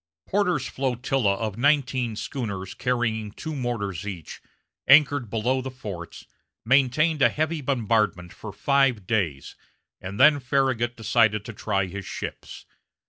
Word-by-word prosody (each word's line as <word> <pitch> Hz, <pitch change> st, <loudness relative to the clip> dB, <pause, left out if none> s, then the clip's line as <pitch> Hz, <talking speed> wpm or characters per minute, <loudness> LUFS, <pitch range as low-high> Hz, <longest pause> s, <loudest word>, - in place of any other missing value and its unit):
Porter's 180 Hz, -9 st, 0 dB
flotilla 125 Hz, -5 st, 0 dB
of 110 Hz, 0 st, -4 dB
nineteen 130 Hz, -4 st, +1 dB
schooners 100 Hz, -7 st, -5 dB
carrying 110 Hz, -4 st, -1 dB
two 155 Hz, +9 st, -6 dB
mortars 105 Hz, -, -3 dB
each, 90 Hz, -7 st, -7 dB, 0.5 s
anchored 140 Hz, -3 st, +5 dB
below 120 Hz, +5 st, 0 dB
the 130 Hz, -, -5 dB
forts, 100 Hz, -9 st, -8 dB, 0.4 s
maintained 140 Hz, +5 st, +3 dB
a -, -, +6 dB
heavy 155 Hz, +1 st, -2 dB
bombardment 110 Hz, -9 st, 0 dB
for 105 Hz, -, -8 dB
five 135 Hz, -2 st, +1 dB
days, 90 Hz, -11 st, -2 dB, 0.5 s
and 95 Hz, +2 st, -7 dB
then 145 Hz, +2 st, +6 dB
Farragut 130 Hz, -3 st, 0 dB
decided 110 Hz, -2 st, +2 dB
to 115 Hz, -, -7 dB
try 100 Hz, -2 st, -1 dB
his 95 Hz, +1 st, -7 dB
ships. -, -, -7 dB
120 Hz, 130 wpm, -25 LUFS, 105-135 Hz, 0.5 s, a